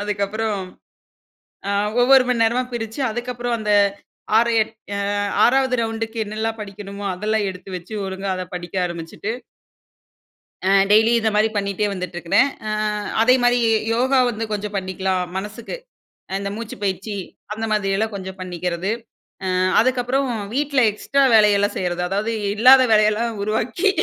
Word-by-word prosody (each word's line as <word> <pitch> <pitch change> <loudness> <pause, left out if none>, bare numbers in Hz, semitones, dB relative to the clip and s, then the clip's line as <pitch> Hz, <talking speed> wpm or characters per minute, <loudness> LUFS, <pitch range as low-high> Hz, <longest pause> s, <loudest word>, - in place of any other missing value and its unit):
அதுக்கப்புறம், 205 0 -2 1.1
அ - - 0 0.3
ஒவ்வொரு 265 +1 +6
மணி 235 -2 +2
நேரமா 235 +3 +2
பிரிச்சு 225 +2 -5
அதுக்கப்புறம் 240 0 -3
அந்த 210 -1 -2 0.7
6 235 +1 +4
எட் 220 - -1 0.2
அ - - -2 0.5
6வது 260 0 +3
ரவுண்டுக்கு 225 0 -4
என்னெல்லாம் 220 +2 -3
படிக்கணுமோ, 200 0 -8
அதெல்லாம் 210 +2 -1
எடுத்து 185 +1 -11
வச்சு 180 +5 -10
ஒழுங்கா 190 +1 -4
அத 185 - -4
படிக்க 175 0 -7
ஆரம்பிச்சுட்டு, 170 +5 -6 1.3
ஆ. - - +1 0.2
டெய்லி 220 +2 +5
இந்த 220 0 +1
மாரி 215 +1 +4
பண்ணிட்டே 200 +1 0
வந்துட்டு 180 -2 -5
இருக்குறேன். 175 +11 +3 0.2
ஆ - - -2 0.5
அதே 250 +2 +5
மாரி 245 0 +4
ஏ - - +3 0.2
யோகா 260 +3 +2
வந்து 225 0 -4
கொஞ்சம் 210 0 -3
பண்ணிக்கலாம் 185 -1 -1
மனசுக்கு, 210 - -6 0.6
அ - - -6
இந்த 200 0 -3
மூச்சுப் 220 -3 -7
பயிற்சி 200 +2 -2 0.4
அந்தமாதிரி 215 -3 -1
எல்லாம் 220 0 -1
கொஞ்சம் 190 0 -7
பண்ணிக்குறது. 180 +2 -3 0.5
அ - - -1 0.3
அதுக்கப்புறம் 255 +2 +1 0.3
வீட்ல 280 -2 +1
எக்ஸ்ட்ரா 275 +6 0
வேலையெல்லாம் 205 -1 +4
செய்யுறது, 180 -1 -2
அதாவது 210 +4 -1 0.2
இல்லாத 255 +4 +7
வேலையெல்லாம் 215 +1 +2
உருவாக்கி, 235 - 0
215 Hz, 140 wpm, -21 LUFS, 195-235 Hz, 1.3 s, இல்லாத